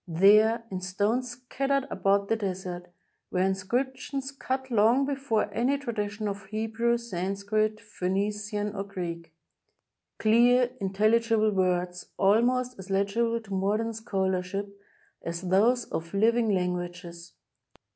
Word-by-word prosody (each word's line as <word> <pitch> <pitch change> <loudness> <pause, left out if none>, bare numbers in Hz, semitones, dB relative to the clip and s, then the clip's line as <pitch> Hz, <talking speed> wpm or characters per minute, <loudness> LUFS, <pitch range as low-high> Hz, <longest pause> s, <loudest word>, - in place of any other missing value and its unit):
There, 210 +7 +5
in 185 -1 -4
stones 205 +7 0
scattered 270 +3 -1
about 200 0 +1
the 225 - +2
desert, 185 -4 -4 0.4
were 180 - 0
inscrip 195 +8 0
tions 275 -1 -5
cut 265 -1 -4
long 230 +5 +4
before 270 -6 -1
any 260 +4 +1
tradition 215 -5 -3
of 200 0 -5
Hebrew, 225 +2 0
Sanskrit, 210 0 -1
Phoenician, 205 +2 -2
or 195 - -2
Greek 170 -4 -6 0.4
— - - -56
clear, 240 +3 +4
intelligible 215 +3 +2
words, 180 -2 0
almost 245 +4 +2
as 190 +1 -10
legible 200 +4 +1
to 200 -3 -9
modern 210 +4 0
scholarship 195 -2 -2 0.5
as 170 +2 -5
those 230 +6 +3
of 165 +3 -4
living 225 +2 +3
lan 180 -3 +1
guages. 175 -1 -7
210 Hz, 125 wpm, -27 LUFS, 190-235 Hz, 0.5 s, There